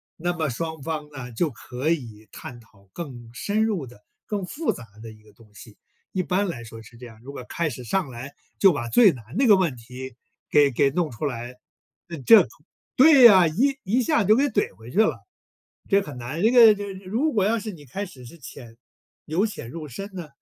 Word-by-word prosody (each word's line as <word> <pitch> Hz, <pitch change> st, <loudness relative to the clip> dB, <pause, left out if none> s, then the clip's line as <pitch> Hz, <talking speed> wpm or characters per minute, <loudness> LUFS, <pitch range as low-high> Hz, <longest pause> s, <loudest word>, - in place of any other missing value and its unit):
那 175 Hz, +2 st, -2 dB
么 160 Hz, -4 st, -1 dB
双 160 Hz, +4 st, -5 dB
方 150 Hz, 0 st, -5 dB
呢， 130 Hz, -4 st, -8 dB
就 150 Hz, +8 st, -1 dB
可 125 Hz, +5 st, -5 dB
以 115 Hz, -9 st, -4 dB
探 120 Hz, -, -10 dB
讨 100 Hz, -4 st, -23 dB
更 125 Hz, -9 st, -8 dB
深 210 Hz, +9 st, 0 dB
入 205 Hz, -10 st, -1 dB
的、 120 Hz, -4 st, -16 dB, 0.2 s
更 205 Hz, -3 st, -3 dB
复 320 Hz, -, -2 dB
杂 115 Hz, -, -10 dB, 0.2 s
的 115 Hz, -, -9 dB
一 110 Hz, 0 st, -17 dB
个 105 Hz, -1 st, -21 dB
东 105 Hz, 0 st, -22 dB
西。 105 Hz, +1 st, -14 dB, 0.4 s
一 185 Hz, -, -1 dB
般 195 Hz, +3 st, 0 dB
来 120 Hz, -10 st, -6 dB
说 115 Hz, 0 st, -11 dB
是 115 Hz, +1 st, -16 dB
这 125 Hz, -, -11 dB
样， 110 Hz, -2 st, -14 dB
如 135 Hz, +3 st, -10 dB
果 125 Hz, -, -8 dB
开 165 Hz, -2 st, -2 dB
始 125 Hz, -1 st, -8 dB
上 165 Hz, -, -1 dB
来 125 Hz, +3 st, -9 dB, 0.2 s
就 195 Hz, -3 st, +5 dB
把 120 Hz, -5 st, -4 dB
最 225 Hz, -, +6 dB
难 125 Hz, -7 st, -11 dB
那 270 Hz, -, +3 dB
个 210 Hz, -, +7 dB
问 175 Hz, -9 st, 0 dB
题， 125 Hz, +2 st, -10 dB, 0.3 s
给 145 Hz, -2 st, +4 dB
给 135 Hz, +3 st, +2 dB
弄 165 Hz, +1 st, -1 dB
出 120 Hz, +6 st, -5 dB
来， 125 Hz, -1 st, -5 dB, 0.7 s
这 225 Hz, -2 st, +7 dB, 0.5 s
对 270 Hz, -3 st, +8 dB
啊， 185 Hz, -5 st, +6 dB
一 265 Hz, -, +1 dB
一 225 Hz, +7 st, +1 dB
下 300 Hz, -3 st, +1 dB
就 210 Hz, +3 st, +4 dB
给 275 Hz, +4 st, +2 dB
怼 260 Hz, -, -1 dB
回 115 Hz, +3 st, -13 dB
去 135 Hz, -, -8 dB
了。 220 Hz, -, +2 dB, 0.7 s
这 200 Hz, 0 st, +4 dB
很 145 Hz, -9 st, -9 dB
难 125 Hz, +7 st, -5 dB
这 225 Hz, +4 st, +4 dB
个 230 Hz, -4 st, +8 dB
这 205 Hz, -, -6 dB
个 195 Hz, -, -7 dB
如 245 Hz, +11 st, 0 dB
果 200 Hz, -3 st, +2 dB
要 225 Hz, +2 st, +1 dB
是 215 Hz, 0 st, -6 dB
你 150 Hz, -5 st, -13 dB
开 195 Hz, +11 st, -5 dB
始 130 Hz, -9 st, -13 dB
是 170 Hz, -, -13 dB
浅 120 Hz, -5 st, -12 dB, 0.5 s
由 175 Hz, +8 st, 0 dB
浅 200 Hz, -, -7 dB
入 155 Hz, -2 st, -7 dB
深 195 Hz, -, -8 dB
呢？ 175 Hz, -4 st, -7 dB
155 Hz, 240 characters per minute, -24 LUFS, 120-200 Hz, 0.7 s, 对